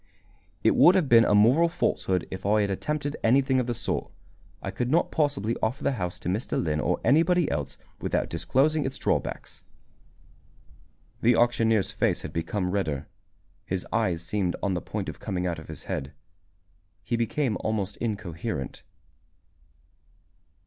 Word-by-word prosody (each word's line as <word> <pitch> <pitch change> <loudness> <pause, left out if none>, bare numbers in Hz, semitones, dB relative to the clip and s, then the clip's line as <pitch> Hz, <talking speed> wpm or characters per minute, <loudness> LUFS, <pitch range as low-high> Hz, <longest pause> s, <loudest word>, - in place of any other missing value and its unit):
"It - - +4
would 180 - +7
have 180 -6 +2
been 115 -2 +7
a 105 - +3
moral 130 +11 +5
falsehood 95 - 0
if 95 0 -6
I 105 +2 +3
had 100 -1 0
attempted 145 +7 -2
anything 130 +3 +3
of 125 - -1
the 120 - -1
sort. - - -2 0.5
I - - -5
could 125 0 -2
not 165 +5 +2
possibly 140 -7 0
offer 110 +4 -1
the - - +2
house 90 -9 -3
to - - -6
Mr. 100 +7 -1
Lynn 75 -2 0
or - - 0
anybody 170 +3 +4
else, 70 -1 -3 0.2
without - - -1
disclosing 150 +3 +1
its 135 0 -3
drawbacks." - - -2 1.6
The 120 +1 +4
auctioneer's 115 -3 +2
face - - 0
had - - -7
become 90 +3 -2
redder. 80 -9 -2 0.6
His 90 0 -2
eyes 90 -8 0
seemed 90 0 -1
on 100 - +1
the 90 - -2
point - - -4
of - - -6
coming 90 -1 -3
out 85 -2 -2
of 80 - -12
his 80 -2 -6
head. 70 +2 -4 0.9
He 120 - -1
became 115 +1 0
almost 105 -3 -2
incoherent. 100 - -4
110 Hz, 155 wpm, -26 LUFS, 90-130 Hz, 1.6 s, would